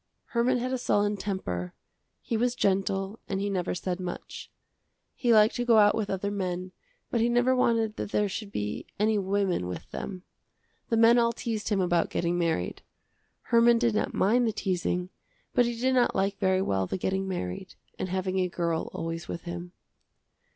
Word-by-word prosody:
Herman 245 +2 +2
had 255 +2 -2
a 260 - -1
sullen 205 -3 +1
temper; 140 - -4 0.5
he 230 - -2
was 240 +2 +1
gentle 195 0 0
and 195 - -1
he 200 +1 -1
never 180 -2 -1
said 180 +1 -3
much. 180 -1 -6 0.6
He 240 - +1
liked 215 -1 +6
to 245 - 0
go 235 -2 +5
out 205 -1 +6
with 215 -2 -2
other 195 +1 -2
men, 185 -2 -3 0.4
but 235 - +1
he 235 - +3
never 245 +2 +3
wanted 225 -3 +1
that - - -4
there 210 - +2
should 200 +1 -5
be 105 - -4
any 215 0 +3
women 190 - 0
with 90 - -7
them. 185 -2 -6 0.7
The 230 - +2
men 230 +2 +6
all 235 0 +2
teased 225 -4 -3
him 205 -3 +1
about 175 -2 +2
getting 175 0 0
married. 165 - -1 0.6
Herman 235 0 +4
did 235 -1 +2
not 215 - 0
mind 235 +5 +3
the 220 - 0
teasing 180 -2 -1 0.4
but 245 - +4
he 235 -1 -4
did 260 +2 +2
not 250 -2 +3
like 195 +1 0
very 190 0 +2
well 95 - 0
the - - -2
getting 190 +1 -1
married 180 - -4 0.2
and 185 - -2
having 190 0 -1
a 180 -1 +1
girl 170 -2 -1
always 165 +1 -4
with 170 - -5
him. 175 0 -6
195 Hz, 185 wpm, -28 LUFS, 180-230 Hz, 0.7 s, liked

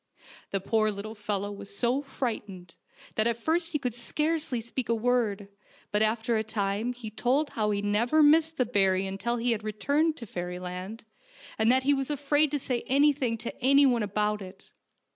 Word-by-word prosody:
The 195 - -1
poor 215 +2 +1
little 210 +1 -5
fellow 205 -1 -3
was 200 0 -9
so 250 +3 +1
frightened 210 -10 -5 0.4
that 215 +1 +1
at 235 -1 0
first 330 +6 0
he 305 - +1
could 250 -5 -3
scarcely 300 +2 -1
speak 235 +2 -4
a 230 - +3
word, 225 -4 0 0.4
but 210 - +1
after 225 +1 +1
a 220 - 0
time 210 +1 -1
he 235 -3 -8
told 265 +7 0
how 215 -2 0
he 205 -1 -1
never 235 +9 +3
missed 320 +2 +4
the 255 - +2
berry 195 -4 +2
until 200 +5 -2
he 240 +1 0
had 220 -2 -1
returned 285 +9 0
to 235 - -7
fairyland, 180 +3 -6 0.5
and 220 +2 +4
that 260 +1 +3
he 285 +2 +4
was 270 0 -1
afraid 290 +1 +2
to 295 - -1
say 255 -3 -2
anything 275 -4 +2
to 230 - -6
anyone 270 -3 +5
about 210 +1 0
it. 190 0 -12
230 Hz, 180 wpm, -28 LUFS, 205-270 Hz, 0.5 s, anyone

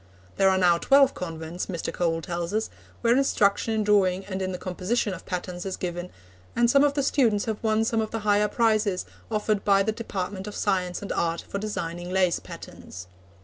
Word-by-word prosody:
There 195 - +5
are 190 - +3
now 175 -2 +4
twelve 275 +3 +5
convents, 165 0 -5
Mr. 175 -4 -4
Cole 165 -2 0
tells 170 +2 -3
us, 220 - -1 0.3
where 235 0 +4
instruction 220 -4 +2
in 215 - +1
drawing 195 -2 +2
and 190 -1 -4
in 185 0 -1
the 180 - -4
composition 190 +4 -1
of 185 - -10
patterns 180 -1 -4
is 190 -1 -4
given, 175 0 -4 0.5
and 235 0 +4
some 275 +1 +5
of 285 -1 +2
the 280 - +1
students 230 -7 +2
have 220 -2 -3
won 220 0 +2
some 225 0 +1
of 220 - -3
the 225 - -4
higher 210 0 +4
prizes 215 -4 +1 0.2
offered 215 -2 0
by 195 -1 +4
the 220 - 0
Department 200 -3 -5
of 210 - -7
Science 185 -2 -1
and 200 - -5
Art 170 0 -1
for 200 - -4
designing 175 -4 -4
lace 185 -2 +2
patterns. 90 0 -10
195 Hz, 200 wpm, -26 LUFS, 180-220 Hz, 0.5 s, There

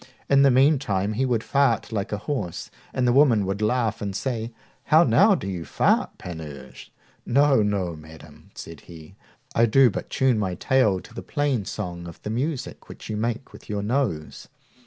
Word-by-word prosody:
In 140 0 +4
the 140 - +6
meanwhile 125 -7 +2
he 130 +5 0
would 120 -3 0
fart 140 -6 +1
like 100 -3 -3
a 105 - -1
horse, 105 - -4 0.2
and 125 -1 0
the 120 - +3
women 125 -7 +4
would 100 +2 -3
laugh 110 0 0
and 100 -2 -4
say, 115 -2 -3 0.3
How 160 +2 +5
now, 200 +4 +5
do - - -6
you 90 -3 -4
fart, - - +1
Panurge? 75 -7 -9 0.3
No, 140 -1 +3
no, 100 -5 -1
madam, 80 0 -15
said 80 -2 -9
he, 80 0 -13 0.4
I 115 +1 +3
do 125 +2 +5
but - - -6
tune 130 -4 +1
my 95 -3 -2
tail 110 -6 +2
to - - -16
the - - -7
plain 140 -8 -1
song 85 -4 -6
of 85 - -11
the 105 - -4
music 135 +4 -4
which - - -9
you - - -2
make 115 +4 -3
with - - -15
your 100 -1 -2
nose. 105 - -2
110 Hz, 185 wpm, -24 LUFS, 95-130 Hz, 0.4 s, the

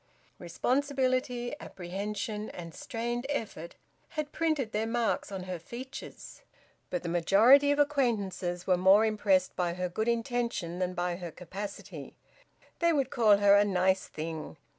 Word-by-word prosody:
Responsibility, 255 - 0
apprehension, 205 +4 -5
and 170 -2 -8
strained 240 +2 -4
effort 215 - -4 0.3
had 305 -2 -4
printed 310 -9 0
their 215 +1 -1
marks 230 -2 -1
on 190 -2 -5
her 180 -1 -5
features. 250 +10 -9 0.5
But 180 -1 -3
the - - -4
majority 210 - +5
of 285 - +3
acquaintances 215 -11 0
were 185 -1 +3
more 190 +4 +6
impressed 205 -4 +2
by 175 -1 -1
her 180 0 -2
good 220 +6 -2
intention 235 -7 -1
than 180 0 -1
by 175 0 -1
her 175 -2 -6
capacity; 195 +5 -8 0.6
they 340 0 +3
would 275 -5 0
call 215 -4 +5
her 200 0 +5
`a 205 0 +5
nice 190 0 +2
thing.' 155 - -6
205 Hz, 140 wpm, -30 LUFS, 180-245 Hz, 0.6 s, more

